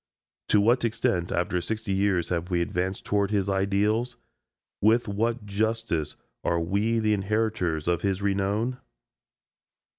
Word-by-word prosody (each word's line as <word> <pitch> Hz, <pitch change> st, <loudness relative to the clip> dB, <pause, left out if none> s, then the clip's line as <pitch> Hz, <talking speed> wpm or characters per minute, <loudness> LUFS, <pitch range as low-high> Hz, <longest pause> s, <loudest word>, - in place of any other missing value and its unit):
To 105 Hz, -, +4 dB
what 120 Hz, +5 st, +3 dB
extent 95 Hz, -6 st, 0 dB
after 90 Hz, 0 st, 0 dB
sixty 110 Hz, +3 st, -3 dB
years 95 Hz, -3 st, +1 dB
have 90 Hz, 0 st, -2 dB
we 90 Hz, -2 st, +1 dB
advanced 90 Hz, +2 st, -2 dB
toward 100 Hz, -1 st, +1 dB
his 100 Hz, -2 st, 0 dB
ideals? 100 Hz, +5 st, +1 dB, 0.6 s
With 115 Hz, +3 st, +4 dB
what 115 Hz, +2 st, -1 dB
justice 105 Hz, -6 st, -1 dB, 0.3 s
are 85 Hz, -, +1 dB
we 100 Hz, +7 st, 0 dB
the 110 Hz, -1 st, +2 dB
inheritors 100 Hz, -6 st, 0 dB
of 85 Hz, -1 st, +1 dB
his 95 Hz, -2 st, 0 dB
renown? 100 Hz, +5 st, 0 dB
100 Hz, 130 wpm, -26 LUFS, 90-110 Hz, 0.6 s, To